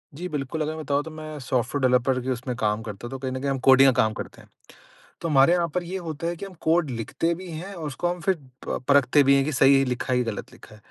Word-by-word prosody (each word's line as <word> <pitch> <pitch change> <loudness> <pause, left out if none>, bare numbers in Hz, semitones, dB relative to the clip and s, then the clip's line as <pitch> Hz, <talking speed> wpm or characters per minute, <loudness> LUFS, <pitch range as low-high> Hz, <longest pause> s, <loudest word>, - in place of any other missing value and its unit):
जी, 180 +4 -5
बिल्कुल। 150 +1 -3
अगर 155 +1 -2
मैं 160 - -6
बताऊँ 145 0 0
तो 160 - -9
मैं 155 -1 -8
सॉफ्टवेयर 130 +1 -1
डेवलपर 125 +1 +2
के 130 - -5
उसमें 125 0 -3
काम 105 0 0
करता 105 +1 -7
तो 135 +2 -6
कहीं 130 -1 -4
न 130 - -4
कहीं 140 - -1
हम 135 - -2
कोडिंग 135 +1 +8
का 125 - +3
काम 110 0 +1
करते - - -8
हैं। - - -20 0.7
तो 165 - -3
हमारे 140 +2 +5
यहाँ 175 -1 +2
पर 180 - 0
ये 185 +3 -5
होता 165 -2 -5
है 170 +1 -2
कि 185 - -7
हम 195 - -11
कोड 160 -3 +2
लिखते 125 +8 -2
भी 185 +2 -9
हैं 175 +5 -7
और 165 -4 -6
उसको 150 +4 -2
हम 175 0 -3
फ़िर 185 +4 +1 0.3
प - - -1
परखते 140 0 +5
भी 140 0 +5
हैं 135 - +3
कि 155 - -2
सही 135 0 +5
लिखा 125 0 -2
या 125 - +2
गलत 115 -3 -5
लिखा। 110 - -15
140 Hz, 275 wpm, -25 LUFS, 130-160 Hz, 0.7 s, कोडिंग